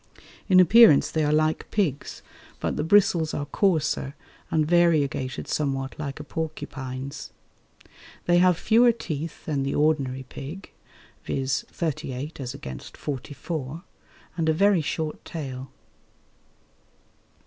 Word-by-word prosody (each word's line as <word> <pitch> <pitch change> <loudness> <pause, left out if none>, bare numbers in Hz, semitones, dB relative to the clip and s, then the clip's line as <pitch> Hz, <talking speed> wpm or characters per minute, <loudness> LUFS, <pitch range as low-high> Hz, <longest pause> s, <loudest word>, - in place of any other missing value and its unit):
In 185 -1 +7
appearance 185 -3 +7
they 160 - 0
are 150 - +1
like 155 +1 +1
pigs, 165 -10 -2 0.4
but - - -2
the - - -1
bristles 170 -3 +3
are 145 - -2
coarser 150 -4 0 0.3
and 155 -1 +2
variegated 155 -6 +1
somewhat 135 -2 -2
like 140 -2 -5
a - - -6
porcupine's. 140 -4 -6 1.0
They 175 0 +4
have 180 -1 +4
fewer 235 +5 +4
teeth 165 -7 -6
than 145 -3 -1
the 135 0 -1
ordinary 140 -4 +1
pig 150 +8 -9 0.5
viz. 135 -1 -1
thirty 155 -5 -3
eight 145 +6 -6
as 130 0 -5
against 65 - -9
forty 145 0 -5
four 160 0 -5 0.5
and 165 -2 0
a - - +4
very 195 +1 +3
short 155 0 -3
tail. 135 -5 -6
155 Hz, 125 wpm, -25 LUFS, 135-170 Hz, 1.0 s, In